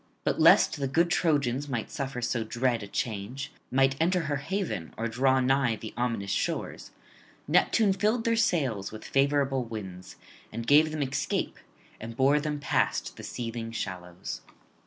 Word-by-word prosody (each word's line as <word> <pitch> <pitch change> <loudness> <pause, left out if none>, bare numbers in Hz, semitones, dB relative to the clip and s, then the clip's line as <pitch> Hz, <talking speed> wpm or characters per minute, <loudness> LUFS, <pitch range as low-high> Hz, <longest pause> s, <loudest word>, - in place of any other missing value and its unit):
But - - 0
lest - - +6
the 135 - 0
good 170 +6 +2
Trojans 145 -5 +1
might 120 -5 -3
suffer 135 -3 -4
so 115 -1 0
dread 120 +1 0
a 100 - -7
change, 115 +7 -4 0.2
might 135 +1 +3
enter 180 +2 +2
her 145 -3 -1
haven 140 - -3
or 115 - -1
draw 130 +3 +2
nigh 130 -2 +2
the 110 0 -8
ominous 115 -5 -1
shores, - - -2 0.6
Neptune 210 -4 +3
filled 215 +4 +1
[23 230 - +2
55]their 225 - +1
sails 130 - 0
with 110 - -9
favourable 135 -1 +2
winds, 95 -6 -8 0.4
and 115 +1 -5
gave 150 +4 +6
them 155 -1 -2
escape, 140 +1 -2 0.4
and 115 +1 -8
bore 140 +3 +4
them 150 -1 -3
past 145 - 0
the - - -10
seething 115 -1 -5
shallows. 90 - -5
130 Hz, 160 wpm, -28 LUFS, 115-145 Hz, 0.6 s, lest